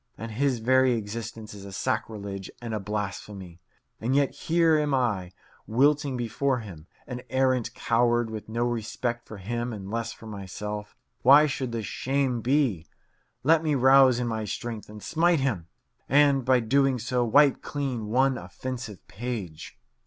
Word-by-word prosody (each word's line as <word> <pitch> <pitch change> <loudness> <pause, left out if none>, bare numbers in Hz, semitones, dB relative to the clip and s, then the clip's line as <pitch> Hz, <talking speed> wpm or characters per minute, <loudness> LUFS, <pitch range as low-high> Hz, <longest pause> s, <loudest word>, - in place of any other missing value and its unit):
and 115 +2 -6
his 130 +3 +1
very 130 +2 +3
existence 110 0 -5
is 100 -1 -10
a 100 - -9
sacrilege 100 -1 -3
and 115 -2 -5
a 110 - -1
blasphemy. 100 -3 -5 0.4
And 125 +4 0
yet 140 -1 +3
here 165 -1 +2
am 145 -2 +1
I, 105 -8 0 0.4
wilting 140 +3 +2
before 125 +2 -1
him, 85 -7 -11 0.2
an 125 0 -6
arrant 130 -2 +1
coward, 120 -1 +1
with 110 -1 -7
no 115 +2 -1
respect 120 +1 -3
for 110 - -9
him 120 +5 -3
and 100 -3 -7
less 115 0 -2
for 115 - -13
myself. 105 0 -6 0.3
Why 140 +4 +8
should 130 -4 -3
this 115 -2 -3
shame 130 +2 -1
be? 120 - +1 0.6
Let 160 +3 +5
me 155 -3 +1
rouse 130 -1 +6
in 125 - -1
my 110 -1 -2
strength 110 +1 -5
and 105 -1 -10
smite 170 0 +2
him, 105 -12 -1 0.4
and, 140 -1 +4
by 130 0 +3
so - - -7
doing, 135 +1 +3 0.3
wipe 145 0 +5
clean 130 -7 -3
one 130 +3 +2
offensive 105 +4 -7
page. 100 -6 -6
120 Hz, 160 wpm, -27 LUFS, 105-135 Hz, 0.6 s, Why